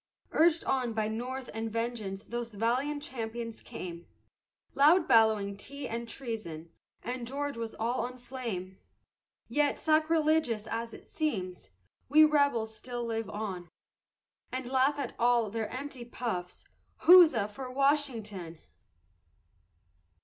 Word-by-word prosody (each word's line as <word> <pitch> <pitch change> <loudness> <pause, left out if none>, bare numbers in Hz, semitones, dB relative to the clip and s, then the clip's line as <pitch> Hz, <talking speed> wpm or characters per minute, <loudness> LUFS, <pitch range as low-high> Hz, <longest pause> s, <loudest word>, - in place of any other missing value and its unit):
Urged 330 +1 +4
on 250 -3 0
by 215 -1 0
North 250 +4 -4
and 225 0 -3
vengeance 225 -4 -3
those 235 -2 -5
valiant 260 +7 0
champions 230 -3 -5
came, 170 -1 -8 0.7
Loud 315 +5 +5
bellowing 215 -3 +4
Tea 280 +7 -7
and 230 0 -4
Treason, 190 -12 -6 0.3
and 245 0 -4
George 285 +2 -3
was 230 -1 -5
all 235 +2 -1
on 250 +1 -7
flame, 230 -8 -6 0.7
Yet 295 -1 +1
sacrilegious 310 -7 +2
as 230 0 -4
it - - -15
seems, 185 - -3 0.4
we 310 +3 +8
rebels 280 -7 +2
still 240 +1 -5
live 225 -2 -3
on, 195 -5 -5 0.8
And 255 -1 -4
laugh 265 +3 +2
at 275 -4 -3
all 235 -3 +3
their 220 -1 -2
empty 265 -1 -6
puffs, 220 -7 -4 0.4
huzza 325 - +8
for 255 +5 -7
Washington! 245 - 0
235 Hz, 120 wpm, -30 LUFS, 220-275 Hz, 0.8 s, we